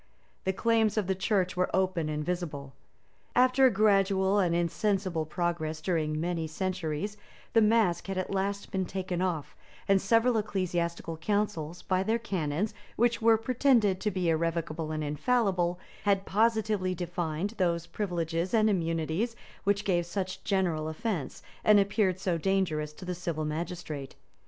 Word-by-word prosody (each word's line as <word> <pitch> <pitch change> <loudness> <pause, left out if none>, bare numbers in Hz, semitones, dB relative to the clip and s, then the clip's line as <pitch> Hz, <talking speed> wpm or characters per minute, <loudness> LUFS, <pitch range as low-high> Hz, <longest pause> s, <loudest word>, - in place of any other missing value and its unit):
The 190 - +2
claims 225 +2 +2
of 210 - +2
the 190 - +1
church 190 -1 0
were 180 0 +1
open 185 -4 +1
and 150 0 -2
visible. 155 -6 -4 0.6
After 255 +1 +5
a - - +2
gradual 195 -1 +3
and 175 -3 +2
insensible 175 -1 0
progress 160 -1 -2
during 155 -2 -1
many 165 -1 -1
centuries, 185 +2 -3 0.4
the 225 - +6
mask 215 -6 +3
had 195 -1 -3
at 185 +1 -2
last 200 +1 -2
been 190 -2 -1
taken 185 -1 -3
off, 175 -6 -2 0.3
and 195 -1 +4
several 230 +3 +3
ecclesiastical 170 -5 -2
councils, 180 -3 -2
by 185 0 +1
their 220 +4 +1
canons, 195 -2 -2 0.2
which 235 +1 +2
were 225 0 +6
pretended 225 -5 +2
to 215 - +1
be 185 -3 -1
irrevocable 165 -1 -1
and 155 0 -2
infallible, 180 - +1 0.2
had 200 -1 +2
positively 215 -3 +1
defined 175 +1 -2
those 170 -2 +1
privileges 175 -1 -2
and 215 -1 +4
immunities 165 +5 -1 0.3
which 200 +1 +1
gave 175 -3 +1
such 185 +1 -4
general 170 -6 0
offence, 165 - -3 0.2
and 210 -1 +6
appeared 195 -2 +1
so 180 -3 0
dangerous 160 -5 0
to 165 +5 -11
the 180 - -2
civil 170 -3 -3
magistrate. 155 -3 -5
185 Hz, 150 wpm, -29 LUFS, 165-205 Hz, 0.6 s, the